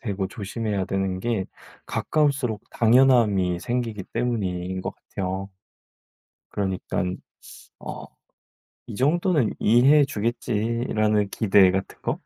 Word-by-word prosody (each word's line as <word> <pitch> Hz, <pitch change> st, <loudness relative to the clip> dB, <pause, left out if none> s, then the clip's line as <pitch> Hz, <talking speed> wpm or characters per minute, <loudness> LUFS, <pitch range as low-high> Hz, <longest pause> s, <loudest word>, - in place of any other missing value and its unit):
되고 100 Hz, -5 st, -2 dB
조심해야 105 Hz, -1 st, -3 dB
되는 95 Hz, -1 st, -2 dB
게 115 Hz, -3 st, -1 dB, 0.4 s
가까울수록 140 Hz, -8 st, 0 dB
당연함이 110 Hz, -7 st, +3 dB
생기기 120 Hz, -4 st, -3 dB
때문인 95 Hz, -6 st, -2 dB
것 -, -, -5 dB
같아요. 95 Hz, 0 st, -5 dB, 1.0 s
그러니깐 95 Hz, -2 st, -2 dB, 0.6 s
어 -, -, -7 dB, 0.8 s
'이 -, -, -7 dB
정도는 155 Hz, -, +1 dB
이해해 135 Hz, +6 st, +5 dB
주겠지.'라는 110 Hz, -3 st, -1 dB
기대 100 Hz, -3 st, +4 dB
같은 95 Hz, +1 st, -3 dB
거? -, -, -2 dB
105 Hz, 245 characters per minute, -24 LUFS, 95-120 Hz, 1.0 s, 이해해